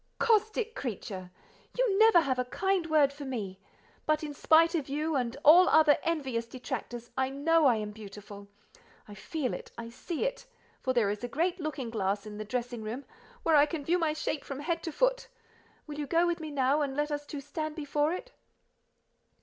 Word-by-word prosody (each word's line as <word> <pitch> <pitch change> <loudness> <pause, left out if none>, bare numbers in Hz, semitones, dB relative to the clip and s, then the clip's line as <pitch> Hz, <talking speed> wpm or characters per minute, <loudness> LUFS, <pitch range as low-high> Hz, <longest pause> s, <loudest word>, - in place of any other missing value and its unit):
"Caustic 445 0 +1
creature! 195 - -5 0.5
You 455 -6 +2
never 440 -6 +7
have 260 -4 -1
a 250 - 0
kind 375 +5 0
word 300 -3 +4
for 290 +1 -9
me; 210 -8 -5 0.5
but 310 0 +2
in 295 -1 -4
spite 325 +3 +4
of 300 -6 -2
you, 305 +2 -1
and 250 -1 -1
all 350 +5 +8
other 310 -2 +5
envious 265 -8 -2
detractors, 240 -1 -6
I 260 0 +1
know 305 +3 +3
I 245 - +5
am 210 -1 -4
beautiful; 205 -1 -11 0.6
I 205 - -10
feel 255 - -3
it, - - -7
I 230 0 -6
see 325 - -4
it—for - - -5
there 225 -5 +2
is 210 +3 -5
a - - -1
great 345 +9 -1
looking 280 -7 -4
glass 200 -1 -1
in 210 0 -8
the - - -3
dressing 240 +1 -3
room, 230 +6 -5 0.4
where 325 - +4
I 290 0 +6
can 295 -1 -5
view 350 +3 +2
my 320 -2 +1
shape 310 -1 -3
from 275 0 -6
head 335 +2 -1
to 325 - -3
foot. - - +1 0.6
Will 300 -1 -7
you 295 - -3
go 335 +3 +3
with 345 -1 0
me 315 -1 -6
now, 280 +1 +2
and 275 -1 -2
let 295 +1 0
us 290 0 -2
two 290 - -5
stand 305 +2 -5
before 295 0 0
it?" 370 +8 -5
290 Hz, 200 wpm, -30 LUFS, 245-330 Hz, 0.6 s, all